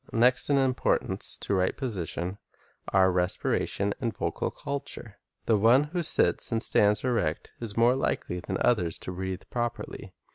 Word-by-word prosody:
Next 125 +4 +4
in 140 - +3
importance 130 -2 +1
to - - -2
right 95 -1 +1
position 95 - -4 0.5
are 95 -1 +4
respiration 95 +2 0
and 115 -4 -3
vocal - - -2
culture. 125 -6 -6 0.3
The 110 -3 +2
one 120 +6 +5
who 175 - 0
sits 160 - +2
and 115 0 +1
stands 105 0 +3
erect 115 -11 -1
is 115 -3 -6
more 120 +2 +5
likely 90 -8 -2
than 95 +2 -4
others 90 -9 +1
to - - -7
breathe 95 +1 -5
properly. 120 -1 -5
110 Hz, 150 wpm, -27 LUFS, 95-120 Hz, 0.5 s, one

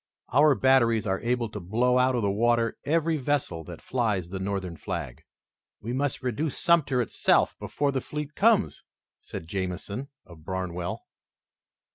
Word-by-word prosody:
Our 145 +1 +6
batteries 115 -5 +3
are 95 -2 0
able 120 0 0
to 105 - -6
blow 120 +7 +2
out 130 0 +3
of 120 - 0
the 100 - +2
water 115 +2 +2
every 160 +1 +1
vessel 135 - -1
that - - -10
flies 105 -9 -1
the 95 +1 -5
Northern 95 -2 -3
flag." 60 -5 -5 0.6
"We 115 +3 -5
must 135 0 -1
reduce 130 +5 -2
Sumter 145 -8 +3
itself - - +2
before 145 -1 -1
the 135 -1 -1
fleet 150 +2 -5
comes," 215 +1 +2 0.4
said 80 - -8
Jamison, 95 +7 -4 0.2
of 85 -3 -15
Barnwell. 90 0 -4
120 Hz, 150 wpm, -27 LUFS, 95-140 Hz, 0.6 s, Our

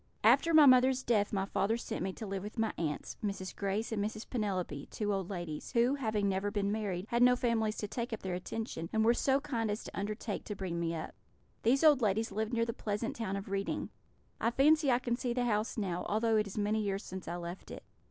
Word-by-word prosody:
"After 335 - +5
my 310 -2 +8
mother's 260 0 +5
death 210 -3 +2
my 195 -2 0
father 205 +3 0
sent - - -5
me 190 +2 -1
to 220 - -7
live 195 -1 -3
with 210 +4 -8
my 225 0 0
aunts, 150 -3 -3
Mrs. 195 -2 -3
Grace 200 +3 -2
and 210 -2 0
Mrs. 215 +1 -4
Penelope, 185 - -2
two 210 -1 -1
old 195 -2 -2
ladies, 175 -3 -5
who, 240 +2 +4
having 220 -7 0
never 195 +1 0
been 200 -1 -1
married, 200 -4 -2
had 235 0 +1
no 250 0 +7
families 225 -3 0
to 210 - -3
take 235 +3 -4
up 225 - -5
their 185 -1 -2
attention, 180 -2 -4
and 220 0 +2
were 235 - +6
so 270 +2 +2
kind 240 -7 -2
as 205 +1 -2
to - - -9
undertake 210 +1 -3
to 210 - -4
bring 185 -3 -3
me 165 0 -1
up. 160 - -5 0.5
These 260 +6 +3
old 295 -4 +6
ladies 215 +1 +1
lived 215 +2 -2
near 230 -1 +1
the 230 - -3
pleasant 210 +2 -3
town 215 -4 -3
of 200 0 -5
Reading. 195 0 -2 0.5
I 230 - +2
fancy 295 +4 +4
I 240 - +4
can 245 -1 -1
see 245 -1 -1
the 245 0 0
house 215 -1 0
now, 180 -5 -2
although 220 +2 +2
it 210 -1 +1
is 200 - -9
many 210 +1 +1
years 200 -1 -2
since 190 0 -7
I 175 - -3
left 175 +1 -7
it. - - -8
215 Hz, 240 wpm, -32 LUFS, 195-235 Hz, 0.5 s, my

